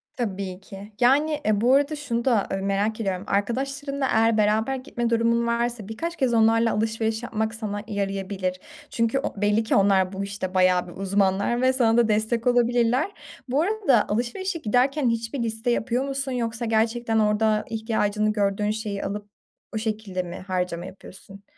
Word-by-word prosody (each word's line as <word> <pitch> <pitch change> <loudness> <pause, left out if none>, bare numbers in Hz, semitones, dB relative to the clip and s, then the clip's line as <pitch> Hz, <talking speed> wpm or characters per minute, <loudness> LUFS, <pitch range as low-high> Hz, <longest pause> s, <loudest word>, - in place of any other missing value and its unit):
Tabii 195 -6 -4
ki. 195 +2 -11
Yani, 295 +5 +3
ııı, 210 -1 +2
bu 245 +3 +4
arada 285 +2 +3
şunu 240 -6 -3
da, 235 -6 +2
ııı, 195 - -2
merak 205 +3 0
ediyorum; 190 -3 -2
arkadaşlarınla 275 +7 -1
eğer 225 -1 +3
beraber 215 +5 +2
gitme 240 -2 -3
durumun 235 0 +2
varsa 235 -2 -1
birkaç 335 +10 -4
kez 260 -7 +1
onlarla 225 0 +4
alışveriş 220 +1 -1
yapmak 220 -1 -2
sana 205 -2 -4
yarayabilir. 195 -2 -3 0.3
Çünkü 230 +3 0
o - - -3
belli 205 +2 +2
ki 220 - 0
onlar 195 -2 +3
bu, 195 +1 -3
işte, 200 -2 -5
bayağı 185 -1 +3
bir 175 - -10
uzmanlar 200 +4 +1
ve 260 0 +3
sana 235 -3 +3
da 235 -2 +4
destek 220 +2 0
olabilirler. 245 - +2 0.4
Bu 275 +4 +2
arada 360 - +2
alışverişe 330 - -2
giderken 255 +3 +2
hiçbir 230 +2 -2
liste 225 +2 -1
yapıyor 245 +2 0
musun 275 -1 -2
yoksa 235 -1 -2
gerçekten 225 +1 +1
orada 215 0 +2
ihtiyacını 215 -1 0
gördüğün 205 0 0
şeyi 215 -2 -4
alıp 205 +1 -5 0.5
o - - 0
şekilde 215 -4 -3
mi 175 0 -7
harcama 180 -2 -2
yapıyorsun? 195 +1 -12
220 Hz, 165 wpm, -24 LUFS, 205-240 Hz, 0.5 s, bu